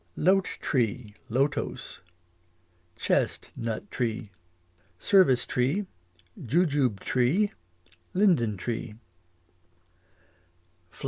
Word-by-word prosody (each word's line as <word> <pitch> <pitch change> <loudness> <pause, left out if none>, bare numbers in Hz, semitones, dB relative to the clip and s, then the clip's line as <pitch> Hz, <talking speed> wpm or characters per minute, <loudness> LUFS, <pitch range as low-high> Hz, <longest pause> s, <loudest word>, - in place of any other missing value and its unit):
Lote 190 0 +2
tree, 120 -4 -1 0.2
lotos 135 +5 -1 0.9
Chest - - 0
nut 115 -2 -4
tree 115 -3 -2 0.7
Service 155 - +4
tree 140 +12 0 0.6
Jujube 140 - +1
tree 150 +12 +2 0.6
Linden 160 - +3
tree. 115 +2 -4
125 Hz, 65 wpm, -27 LUFS, 115-175 Hz, 0.9 s, Service